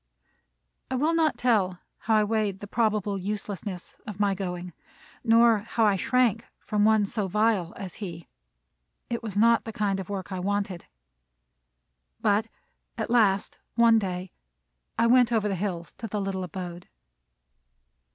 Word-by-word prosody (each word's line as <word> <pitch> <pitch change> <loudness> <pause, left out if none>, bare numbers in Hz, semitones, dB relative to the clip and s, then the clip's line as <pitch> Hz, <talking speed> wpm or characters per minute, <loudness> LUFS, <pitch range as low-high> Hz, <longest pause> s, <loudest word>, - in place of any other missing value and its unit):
I 260 - -1
will 300 +6 +2
not 320 -3 +2
tell 200 -7 +2 0.2
how 220 - +1
I 215 - +4
weighed 210 -2 0
the 205 - -7
probable 210 -2 0
uselessness 195 -2 -5
of 210 -2 -7
my 200 -1 +2
going, 180 -2 -5 0.5
nor 230 -1 +5
how 225 +2 0
I 205 -2 +4
shrank 235 +2 +1
from 210 -1 0
one 215 -1 +4
so 205 -1 -2
vile 210 -3 +1
as 190 -3 -6
he. 170 -4 -6 0.8
It 235 - -1
was 210 -4 -5
not 230 +2 +5
the 225 - -5
kind 200 -3 -1
of 190 - -6
work 195 -1 -5
I 185 - -3
wanted. 195 -1 -2 1.3
But - - +2 0.5
at - - -3
last 205 -5 +2 0.2
one 230 -1 +6
day 185 -2 -4 0.7
I 230 - +3
went 245 0 +5
over 220 -3 +2
the 200 - -1
hills 180 -3 -3
to 225 - -4
the 210 0 -3
little 195 -1 -2
abode. 175 0 -7
205 Hz, 150 wpm, -27 LUFS, 190-225 Hz, 1.3 s, one